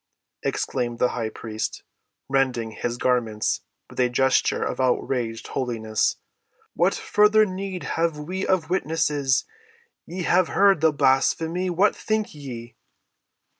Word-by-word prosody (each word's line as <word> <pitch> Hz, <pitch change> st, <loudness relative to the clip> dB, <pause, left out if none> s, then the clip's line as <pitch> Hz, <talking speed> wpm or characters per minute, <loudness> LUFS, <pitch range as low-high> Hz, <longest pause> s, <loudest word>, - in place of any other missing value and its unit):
exclaimed 120 Hz, -2 st, -2 dB
the 125 Hz, -, +2 dB
high 115 Hz, -3 st, -3 dB
priest, 110 Hz, 0 st, -5 dB, 0.4 s
rending 130 Hz, -4 st, 0 dB
his 120 Hz, +2 st, -3 dB
garments 115 Hz, -4 st, 0 dB, 0.3 s
with -, -, -11 dB
a 125 Hz, -1 st, +3 dB
gesture 130 Hz, +2 st, +2 dB
of -, -, -3 dB
outraged 125 Hz, -2 st, -1 dB
holiness. 115 Hz, -5 st, -1 dB, 0.6 s
"What -, -, +2 dB
further 210 Hz, +1 st, +4 dB
need 190 Hz, -1 st, -5 dB
have 165 Hz, -2 st, -1 dB
we 180 Hz, +6 st, -4 dB
of 175 Hz, -3 st, +1 dB
witnesses? 150 Hz, -6 st, +1 dB, 0.6 s
Ye 180 Hz, +2 st, -4 dB
have 180 Hz, +1 st, +3 dB
heard 195 Hz, -5 st, +4 dB
the 160 Hz, -1 st, +5 dB
blasphemy: 160 Hz, +6 st, +1 dB
what 180 Hz, +4 st, +3 dB
think 215 Hz, -1 st, -2 dB
ye?" 120 Hz, -6 st, -9 dB
135 Hz, 125 wpm, -24 LUFS, 120-180 Hz, 0.6 s, the